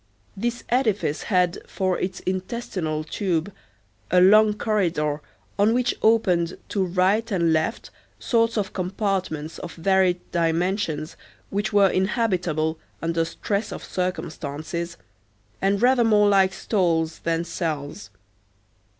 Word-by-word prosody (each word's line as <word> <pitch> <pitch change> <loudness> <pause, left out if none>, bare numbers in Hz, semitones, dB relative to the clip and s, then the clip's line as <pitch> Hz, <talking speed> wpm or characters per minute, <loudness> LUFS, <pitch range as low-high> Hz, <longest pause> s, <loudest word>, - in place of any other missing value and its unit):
This 240 +4 -3
edifice 215 - +1
had, 180 -3 +2
for 185 -2 -1
its 185 0 -3
intestinal 185 -5 -3
tube, 175 +2 -2 0.6
a 180 - +4
long 210 +3 +6
corridor, 170 -9 0 0.4
on 215 +3 +4
which 245 0 +1
opened 185 -7 +2
to 195 - 0
right 190 +5 +1
and 170 -5 +2
left 160 0 -1 0.3
sorts 230 -1 +1
of 200 -2 -2
compartments 185 -5 -2
of 170 - -8
varied 185 +1 +2
dimensions 170 -1 0 0.4
which 205 +2 -1
were 200 -2 +5
inhabitable 180 -6 0 0.2
under 165 0 0
stress 200 +5 -3
of - - -7
circumstances, 170 -2 -4 0.6
and 195 +2 +1
rather 250 -1 +5
more 210 -2 +4
like 195 -2 +4
stalls 170 -6 0
than 165 0 -1
cells. 150 - -4
185 Hz, 115 wpm, -24 LUFS, 165-205 Hz, 0.6 s, long